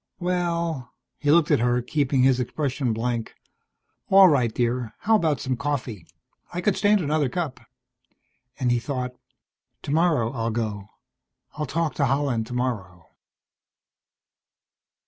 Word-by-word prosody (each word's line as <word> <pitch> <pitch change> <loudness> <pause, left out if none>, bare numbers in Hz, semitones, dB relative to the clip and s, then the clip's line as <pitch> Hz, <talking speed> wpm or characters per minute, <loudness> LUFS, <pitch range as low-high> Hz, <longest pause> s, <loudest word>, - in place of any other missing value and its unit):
"Well." 170 -6 -2 0.2
He 145 - -1
looked 160 0 +4
at - - +4
her, 120 +1 +2
keeping 140 -2 +1
his 130 -1 +4
expression 130 0 -1
blank. 115 +1 -3 0.7
"All 195 0 +8
right, 130 -8 +2
dear. 120 0 -1
How 220 +1 +3
about 160 - +1
some 130 +1 -2
coffee? 125 - -4 0.4
I 175 - -4
could 185 +2 +1
stand 205 -1 +3
another 150 -3 +1
cup." 160 -1 -3 1.0
And 125 -2 +1
he 120 - +2
thought: 125 -1 -4 0.7
_Tomorrow 150 -6 +1
I'll 115 0 -2
go. 110 -3 -3 0.7
I'll 150 -1 -4
talk 165 0 -1
to 140 - +3
Holland 135 -4 0
tomorrow. 105 -9 -4
130 Hz, 125 wpm, -24 LUFS, 120-155 Hz, 1.0 s, All